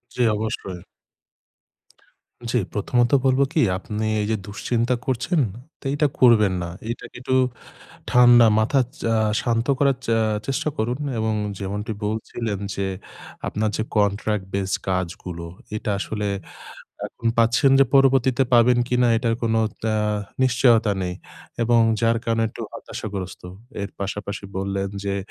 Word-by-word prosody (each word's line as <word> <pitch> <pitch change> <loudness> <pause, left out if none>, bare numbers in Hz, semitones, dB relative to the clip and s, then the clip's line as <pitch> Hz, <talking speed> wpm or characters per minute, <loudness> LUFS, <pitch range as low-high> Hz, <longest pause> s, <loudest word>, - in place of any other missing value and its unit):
জি - - -1
অবশ্যই। 100 -4 -4 1.7
জি, 125 - +2 0.2
প্রথমত 120 +3 +1
বলবো 130 +1 +4
কি 165 - +2 0.2
আপনি 105 +3 -4 0.2
এইযে 105 +2 0
দুশ্চিন্তা 115 +4 -1
করছেন 130 +7 0 0.4
তো - - -21
এটা 145 +1 +2
করবেন 110 -6 +5
না। 85 - -4 0.2
এটাকে 115 - -6
একটু 130 0 0 0.8
ঠান্ডা 120 -1 +7
মাথা 135 +6 +3 0.2
চা 115 - +1 0.3
শান্ত 115 0 0
করার 140 -1 +3
চা 115 - +2 0.3
চেষ্টা 135 +2 -1
করুন 120 +4 -1 0.2
এবং 110 0 0 0.2
যেমনটি 105 +3 -4
বলছিলেন 110 0 -3 0.2
যে 100 - -2 0.6
আপনার 110 +1 -1
যে - - 0
কন্ট্রাক্ট 105 0 +1
বেস 95 -1 -1 0.2
কাজগুলো 90 -2 -3 0.3
এটা 110 - -3
আসলে 105 0 -3 0.8
এখন 115 - -5
পাচ্ছেন। 115 +4 +4
যে 135 - +7
পরবর্তীতে 135 -1 +4
পাবেন 120 +1 +6
কিনা 125 -1 +2
এটার 115 -1 0
কোন 115 -1 +1 0.4
আ - - +1 0.5
নিশ্চয়তা 120 -3 +4
নেই। 90 0 -2 0.5
এবং 120 0 +4 0.2
যার 115 0 +3
কারণে 115 0 +1
একটু - - -9
হতাশাগ্রস্ত। 95 -4 -6 0.4
এর 100 - -4
পাশাপাশি 100 +1 -4
বললেন 100 0 -2
যে 100 -1 -1
115 Hz, 130 wpm, -23 LUFS, 100-120 Hz, 1.7 s, ঠান্ডা